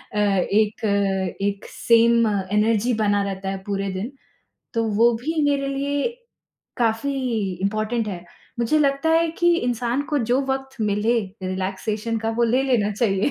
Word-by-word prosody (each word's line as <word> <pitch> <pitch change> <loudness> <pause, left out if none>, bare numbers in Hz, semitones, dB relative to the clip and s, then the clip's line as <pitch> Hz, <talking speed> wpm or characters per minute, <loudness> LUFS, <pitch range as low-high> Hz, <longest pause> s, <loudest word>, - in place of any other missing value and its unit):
अ, - - -1 0.3
एक 215 +1 +1 0.6
एक 200 0 -2
same 230 0 +4
energy 210 +3 +1
बना 205 -1 +2
रहता 195 -1 -4
है 195 - -3
पूरे 195 -1 -2
दिन, 200 +7 -4 0.6
तो 230 -1 +1
वो 235 +3 +5
भी 315 +5 -1
मेरे 280 -1 +1
लिए 280 - -1 0.7
काफ़ी 235 +3 0 0.5
इम्पॉर्टेंट 215 +3 -1
है। 180 -3 -6 0.4
मुझे 270 +7 +2
लगता 280 +2 +2
है 330 0 +3
कि 345 0 +4
इंसान 245 0 -1
को 295 - +2
जो 255 +2 +3
वक़्त 265 0 -3
मिले 210 +3 +1 0.2
रिलैक्सेशन 195 +4 -2
का 225 0 -2
वो - - +3
ले 245 +3 +2
लेना 235 -6 +2
चाहिए। 200 +2 +1
230 Hz, 150 wpm, -23 LUFS, 205-265 Hz, 0.7 s, वो